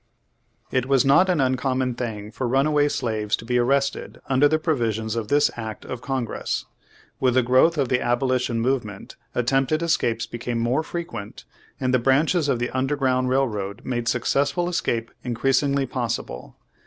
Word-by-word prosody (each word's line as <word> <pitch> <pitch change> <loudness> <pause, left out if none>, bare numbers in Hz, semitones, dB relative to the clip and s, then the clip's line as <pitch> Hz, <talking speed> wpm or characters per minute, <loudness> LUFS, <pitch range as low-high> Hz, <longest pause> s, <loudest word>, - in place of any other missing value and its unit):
It 130 -1 0
was 135 0 +3
not 145 +8 +5
an 175 -4 +2
uncommon 130 -1 0
thing 110 -4 -5
for 120 +3 -3
runaway 145 +3 +2
slaves 110 -5 -1
to - - -11
be 125 +1 +1
arrested 140 +3 0
under 135 +2 +4
the 155 +2 +2
provisions 115 -8 -1
of 115 -2 -3
this 145 +5 +3
act 110 -2 -6
of 125 - -6
Congress. 125 -3 -3 0.5
With 125 -2 +2
the 130 - +4
growth 130 +7 +4
of 140 -3 +1
the 125 - +2
Aboli 125 +2 +1
tion 115 -2 -1
Movement 115 -6 -2 0.2
attempted 135 +6 +1
escapes 115 -9 +1
became 120 0 -3
riiore 130 +7 +1
frequent, 165 -12 -6 0.4
and 130 -1 0
the 130 - +4
branches 145 +5 +2
of 125 - +2
the 120 +1 -2
Underground 130 -1 0
Railroad 110 -6 -1
made 120 -2 -2
successful 140 +7 +1
escape 115 -9 -1
increasingly 135 +3 +1
possible. 120 - -4
130 Hz, 160 wpm, -23 LUFS, 115-140 Hz, 0.5 s, not